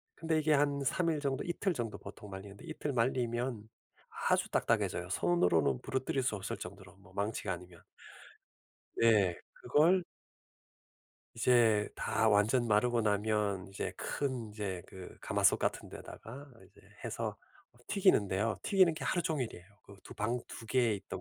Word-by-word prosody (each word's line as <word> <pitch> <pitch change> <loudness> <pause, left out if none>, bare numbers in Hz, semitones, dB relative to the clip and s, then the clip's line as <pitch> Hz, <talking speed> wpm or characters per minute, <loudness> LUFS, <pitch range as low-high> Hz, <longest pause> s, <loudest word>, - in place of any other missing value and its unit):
근데 160 -1 0
이게 155 0 +3
한 140 0 +2
3 165 +6 +1
일 155 - -1
정도 140 -2 -1
이틀 175 +2 -1
정도 115 -6 -4
보통 100 +1 -10
말리는데 100 - -9
이틀 155 -3 -4
말리면 120 -2 -1 0.6
아주 - - +2
딱딱해져요. - - 0
손으로는 85 -6 +2
부러뜨릴 130 0 -1
수 110 - 0
없을 95 +1 -4
정도로 95 +1 -10
뭐 95 -1 -19
망치가 100 -1 -2
아니면. 90 -1 -11 1.1
네. 105 -6 +4 0.3
그걸 175 +5 +4 1.3
이제 115 -3 +4
다 110 0 +1
완전 110 +4 +3
마르고 115 +3 +3
나면 105 -2 0
이제 95 - -4
큰 130 -6 -3
이제 100 -4 -4
그 95 -1 -11
가마솥 - - +3
같은 - - -2
데다가 135 +6 -10 0.2
이제 - - -21 0.2
해서 - - -3 0.5
튀기는데요. 105 - +2
튀기는 185 -4 +4
게 155 -3 -6
하루 175 +5 0
종일이에요. 130 - -3 0.2
그 100 - -14
두 - - -10
방 115 +4 -1
2 115 - -9
개 120 -1 +3
있던 100 - -6
115 Hz, 295 characters per minute, -33 LUFS, 100-135 Hz, 1.3 s, 네